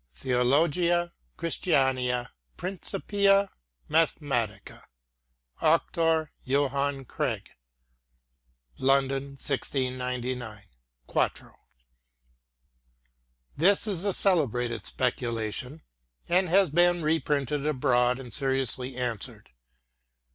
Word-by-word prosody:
Theologiæ 165 - +2 0.3
Christianæ 130 -7 0 0.3
Principia 195 +1 +1 0.4
Mathematica. 145 -8 -1 0.8
Auctore 165 -1 +2
Johanne 140 0 0
Craig. - - -3 1.3
London, 135 +1 +1
1699, 125 -5 -3 0.4
4to. - - -1 2.0
This 190 +7 +4
is 195 -5 -1
a 200 - +1
celebrated 125 - +1
speculation, 125 +3 -3 0.4
and 180 +1 +2
has 190 -2 +4
been 175 +1 +3
reprinted 150 -2 0
abroad, 125 -3 +2
and 125 -3 -8
seriously 130 -2 +1
answered. 120 - -4
140 Hz, 70 wpm, -27 LUFS, 125-165 Hz, 2.0 s, This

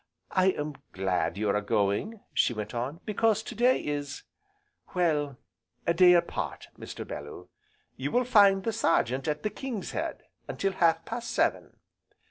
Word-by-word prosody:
I 185 0 +3
am 150 -6 -1 0.2
glad 90 -2 0
you 105 0 0
are 105 - +1
going," 105 - 0
she 120 - +2
went 105 +1 -5
on, 130 +8 -3
"because 215 0 +1
to - - -7
day 245 +3 +3
is 145 -1 -4 0.7
well, 150 -6 +1 0.5
a 170 - +3
day 180 +1 +7
apart, 175 - -1
Mr. - - -8
Bellew. 75 +5 -8 0.5
You 135 +2 -2
will 250 +9 +2
find 200 -5 +5
the 225 - -1
Sergeant 135 - +1
at 150 -1 -1
the 215 - -1
'King's 235 -3 -5
Head,' - - -4 0.2
until 195 - -1
half 165 -3 +2
past 235 +1 -5
seven." - - 0
165 Hz, 155 wpm, -28 LUFS, 120-200 Hz, 0.7 s, day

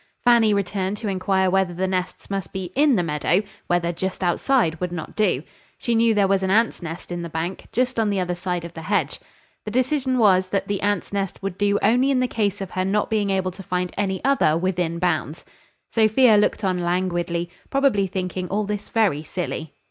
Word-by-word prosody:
Fanny 235 -3 +5
returned 200 0 -1
to 220 - -5
inquire 190 0 +1
whether 190 -2 +1
the 185 +2 0
nests 185 +1 -3
must 195 -4 -3
be 185 -2 -5
in 285 -1 +4
the 180 - +1
meadow; 165 +5 +1 0.2
whether 175 -1 +1
just 190 +2 -3
outside 175 - +1
would 180 -1 -2
not 175 -3 -6
do. 180 -10 +1 0.3
She 235 - -1
knew 225 -1 +3
there 200 -1 +3
was 195 0 +2
an 190 - -1
ants' 225 +2 +2
nest 170 +1 -7
in 175 0 -3
the 170 - -5
bank, 165 +4 -4
just 255 -1 0
on 220 -2 +2
the 200 -1 0
other 180 -1 -1
side 175 -1 -3
of 170 - -9
the 160 - -8
hedge. 200 +5 -1 0.4
The - - -5
decision 255 +2 +1
was 190 -5 +4
that 195 - -1
the 200 -1 -2
ants' 205 -1 -1
nest 195 -1 -3
would 195 -2 -3
do 205 +1 +2
only 245 +6 +4
in 255 -2 +2
case 205 -3 -1
of 195 - -5
her 185 - -1
not 205 +3 0
being 210 -2 +1
able 190 -1 0
to 190 - -11
find 180 -1 -2
any 190 0 -2
other 270 - +3
within 175 -2 -1
bounds. 165 -3 -1 0.5
Sophia 225 +1 +5
looked 210 +1 +2
on 185 -2 +1
languidly, 175 -1 -1 0.2
probably 270 -8 +2
thinking 185 -1 -3
all 205 +4 -1
this 205 0 -4
very 205 -10 +2
silly. 160 -2 -5
190 Hz, 210 wpm, -23 LUFS, 175-210 Hz, 0.5 s, Fanny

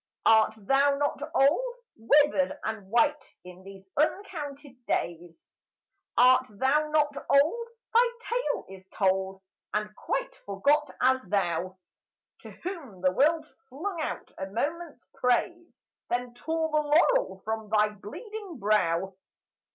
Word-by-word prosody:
Art 220 -1 +5
thou 275 +6 +2
not 285 -1 -1
old? 405 - +3 0.2
Withered 285 +4 +3
and 205 -3 -5
white 290 +5 +1
in 180 0 -12
these 195 0 -13
uncounted 290 -6 -3
days; 170 -1 -3 0.7
Art 255 +1 +6
thou 270 +8 +1
not 295 -1 +2
old? 325 +13 +3 0.3
Thy 475 +2 +6
tale - - -2
is 190 -1 -12
told, 190 0 -1 0.3
And 210 0 -2
quite - - -3
forgot 295 +1 +2
as 260 +1 +4
thou, 185 -1 -1 0.6
To - - -11
whom 295 - -8
the 185 0 +3
world 305 - +2 0.2
flung 330 +6 -4
out - - -5
a 190 - -3
moment's 290 - -4
praise, 335 +8 -1 0.3
Then 245 0 -2
tore 320 +5 -2
the 305 0 +3
laurel 350 +13 +2
from 220 -1 -3
thy 210 0 +3
bleeding 370 - -9
brow. 195 -4 +1
270 Hz, 125 wpm, -28 LUFS, 210-310 Hz, 0.7 s, Art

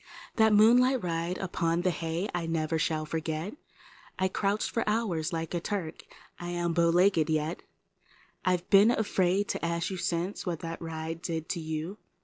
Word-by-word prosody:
That 220 -1 +5
moonlight 245 +4 +5
ride 170 +1 -2
upon 170 -2 -1
the 185 0 +2
hay 165 +3 -2
I 175 -2 -2
never 160 0 0
shall 155 -1 0
forget; 160 +4 -3 0.6
I 190 0 +1
crouched 200 +2 0
for 230 - 0
hours 185 -8 0
like 165 -1 -3
a 175 - 0
Turk, 170 -3 -4 0.4
and 175 0 -5
1 175 - -2
m 170 - +1
bowlegged 170 0 +3
yet; 155 +2 -1 0.4
#,, - - -31
I've 180 -1 0
been 200 +2 +7
afraid 200 -4 +1
to - - -2
ask 170 +2 -1
you 190 - -3
since 175 +2 -2
what 170 -4 -3
that 165 0 -5
ride 165 0 -5
did 160 -2 -4
to - - -2
you. 160 +5 -4
170 Hz, 175 wpm, -29 LUFS, 165-195 Hz, 0.6 s, been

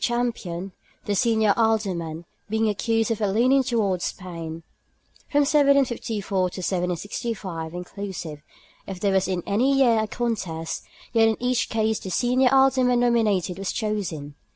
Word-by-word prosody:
Champion, 210 -7 -2 0.3
the 205 - 0
senior 220 -1 +3
Alderman, 185 -8 0 0.2
being 220 +1 +1
accused 225 +2 0
of 225 - -2
a 205 - +2
leaning 250 +7 +3
towards 215 -8 0
Spain. 165 -3 -6 0.7
From 290 - +3
1754 275 -8 +2
to - - +4 0.2
1765 180 -1 -3
(inclusive) 180 -4 -6 0.5
if 190 -2 -6
there 200 0 +1
was 190 0 +2
in 180 -2 -2
any 255 +7 +2
year 240 -5 +4
a 220 - 0
contest, 195 -9 -3 0.3
yet 225 -1 +5
in 220 - +1
each 250 -1 0
case 220 -1 0
the 190 - -7
senior 250 +7 +3
Alderman 260 -2 +4
nominated 210 -7 +1
was 195 - -2
chosen. 185 -10 -3
215 Hz, 140 wpm, -24 LUFS, 185-240 Hz, 0.7 s, yet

